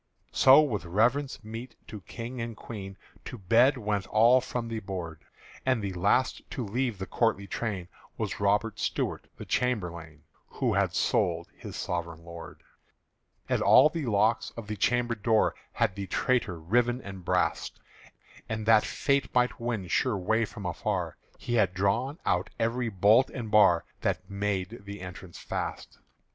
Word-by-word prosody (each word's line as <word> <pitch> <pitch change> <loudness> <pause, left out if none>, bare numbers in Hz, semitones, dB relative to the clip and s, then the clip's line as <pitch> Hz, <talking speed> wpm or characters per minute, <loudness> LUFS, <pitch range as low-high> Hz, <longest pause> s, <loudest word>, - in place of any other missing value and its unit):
So 135 +3 +7
with 120 -10 -1
reverence 115 +10 +1
meet 115 +3 -8
to 105 -2 -9
King 115 +8 -7
and 115 -1 -5
Queen 100 -4 -8 0.3
To - - -7
bed 115 +7 +4
went 105 -4 -2
all 120 +4 +5
from 120 -2 -4
the 115 -1 -3
board; 90 -6 -6 0.4
And 130 -2 +2
the 100 -1 -3
last 100 +8 +1
to 125 - -4
leave 120 +1 -1
the 95 - -4
courtly 115 -3 0
train 100 -3 -4 0.3
Was - - -3
Robert 105 +2 +1
Stuart - - -2
the - - -8
chamberlain 85 -10 -2 0.2
Who - - -1
had - - +1
sold - - +1
his - - -9
sovereign 85 -1 -4
lord. 85 -1 -10 0.8
And - - 0
all 150 - +7
the 155 -4 -4
locks 110 +1 +2
of 115 - -6
the 105 +1 -4
chamber 120 +3 +1
door 110 0 +2 0.2
Had - - +1
the 100 0 -6
traitor 100 -4 0
riven 120 +9 +1
and 95 -2 -8
brast; 90 +1 0 0.7
And 110 -1 -3
that 110 -1 +6
Fate 140 -1 0
might 125 0 +2
win 115 -6 -3
sure 115 +5 +1
way 110 +5 +1
from 105 -2 -9
afar, 90 - -2 0.2
He 120 - -4
had 100 -6 +2
drawn 115 - 0
out 90 +4 +1
every 115 +1 0
bolt 105 +6 +4
and 115 -5 -6
bar 105 -6 +5
That - - -2
made 100 +2 -2
the 100 0 -8
entrance 90 -1 -9
fast. - - -5
110 Hz, 160 wpm, -28 LUFS, 95-120 Hz, 0.8 s, So